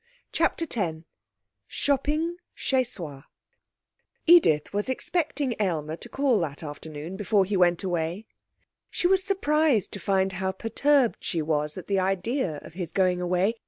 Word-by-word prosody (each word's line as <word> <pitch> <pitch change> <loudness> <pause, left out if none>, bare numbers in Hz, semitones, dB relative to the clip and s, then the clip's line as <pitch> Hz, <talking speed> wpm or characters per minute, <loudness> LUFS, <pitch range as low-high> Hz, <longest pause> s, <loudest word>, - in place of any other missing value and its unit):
CHAPTER 330 0 +1
X 180 - -1 0.7
Shopping 300 +5 0 0.2
Chez 260 -1 +1
Soi 165 - -7 1.0
Edith 245 - +5
was 205 +4 -1
expecting 290 -1 -1
Aylmer 160 -6 -1
to - - -10
call 270 -5 +2
that 155 -3 -4
afternoon 155 +3 -7
before 205 -1 +2
he 200 +2 -2
went 175 -1 +3
away. 175 +2 -2 0.6
She - - -3
was 380 +1 +4
surprised 305 - +2
to 200 - -5
find 190 0 +1
how 190 0 -2
perturbed 250 +5 +1
she 165 -3 -1
was 150 0 -1
at 185 - -7
the 195 -1 +1
idea 190 - -1
of - - -12
his 175 -2 -5
going 180 0 +2
away. 180 +5 +1
195 Hz, 145 wpm, -26 LUFS, 170-270 Hz, 1.0 s, Edith